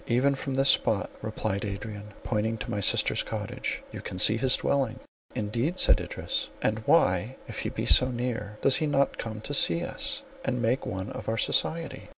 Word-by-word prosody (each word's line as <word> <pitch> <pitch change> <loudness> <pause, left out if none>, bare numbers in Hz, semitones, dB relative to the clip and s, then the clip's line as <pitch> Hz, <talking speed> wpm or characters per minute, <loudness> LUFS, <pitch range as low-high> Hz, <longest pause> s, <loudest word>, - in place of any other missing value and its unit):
"Even 130 +4 +3
from 135 0 -4
this 135 +1 +4
spot," - - +1
replied 100 +1 -3
Adrian, 105 0 -6
pointing 110 0 -1
to 115 - -6
my 105 - -1
sister's 100 - +2
cottage, - - -4
"you - - -7
can 95 - -7
see 110 +4 +6
his 125 +3 +3
dwelling." 135 -5 0 0.4
"Indeed!" 120 - -1
said - - +5
Idris, - - -3
"and 110 0 0
why, 95 +8 +3
if - - -6
he - - -2
be - - -4
so 130 - +6
near, 120 -4 -4
does 135 - +5
he 155 - 0
not 140 -1 +1
come 110 -1 -5
to 145 - -6
see 170 +4 +4
us, 280 +7 -4 0.2
and 125 - -1
make 120 +3 0
one 95 +2 -4
of - - -6
our 115 - -1
society?" 165 +8 -1
115 Hz, 190 wpm, -27 LUFS, 105-135 Hz, 0.4 s, see